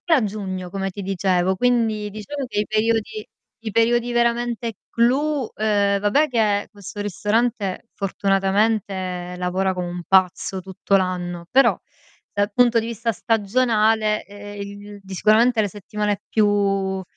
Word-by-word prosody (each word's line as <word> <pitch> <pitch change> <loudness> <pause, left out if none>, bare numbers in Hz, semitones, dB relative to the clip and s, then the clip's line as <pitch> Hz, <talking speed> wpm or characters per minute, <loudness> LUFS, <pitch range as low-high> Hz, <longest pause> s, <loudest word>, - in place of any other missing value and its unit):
E - - +6
a 275 -7 +4
giugno 190 -3 -4
come 195 +1 -3
ti 195 +2 -7
dicevo, 190 -1 +1
quindi 225 -2 +1
diciamo 215 +7 -5
che 210 -4 -2
i 210 - +1
periodi 215 0 0 0.4
i 220 - -3
periodi 235 +2 +2
veramente 235 -1 0 0.2
clou 270 +3 +1
ehm, 205 -2 +2
vabbè 210 +10 +3
che 210 -4 +1
questo 205 -1 -10
ristorante 210 +1 -1
fortunatamente 195 -2 0
lavora 185 +1 0
come 180 -1 -3
un 175 0 -5
pazzo 190 0 +2
tutto 190 +1 -1
l'anno, 175 -2 -3
però 270 +1 +5 0.6
dal 205 +1 0
punto 240 +1 +4
di 225 - -4
vista 230 0 -2
stagionale, 220 -1 +1
ehm, 205 0 -9
il 205 0 -9
di 195 0 -10
sicuramente 220 +5 +4
le 205 - 0
settimane 205 +1 -3
più, 195 -2 +1
205 Hz, 140 wpm, -22 LUFS, 195-230 Hz, 0.6 s, E